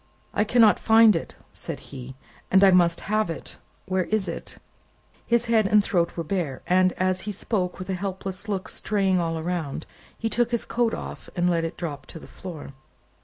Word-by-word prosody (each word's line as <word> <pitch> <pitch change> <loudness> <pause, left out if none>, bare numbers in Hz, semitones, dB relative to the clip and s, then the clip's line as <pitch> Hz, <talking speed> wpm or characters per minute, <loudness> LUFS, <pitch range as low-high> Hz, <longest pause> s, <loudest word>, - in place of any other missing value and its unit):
"I 210 - +2
cannot 225 -1 +5
find 225 -1 +6
it," 165 - -4 0.2
said - - -6
he, 130 -1 -10 0.3
"and 190 +1 +5
I 195 - +8
must 170 -2 +4
have 215 -2 0
it. 165 - -7 0.3
Where 185 -2 0
is 215 -3 0
it?" - - -6 0.7
His 235 0 +2
head 225 -3 +3
and 210 0 +5
throat 175 -4 0
were 170 - -1
bare, 160 -6 -3
and, 185 0 +4
as 185 0 0
he - - -1
spoke 190 -2 -2
with 185 - -7
a 190 - -2
helpless 190 +1 -4
look 195 0 -2
straying 195 -3 +1
all 165 -1 -1
around, 160 -3 -3 0.3
he 225 - -2
took 240 +1 +1
his 235 -1 -1
coat 235 -1 0
off, - - -8
and 175 -1 +1
let 170 -2 +1
it 165 - -4
drop 145 -5 -5
on - - -6
the - - -13
floor. 165 -6 -9
185 Hz, 195 wpm, -25 LUFS, 170-210 Hz, 0.7 s, I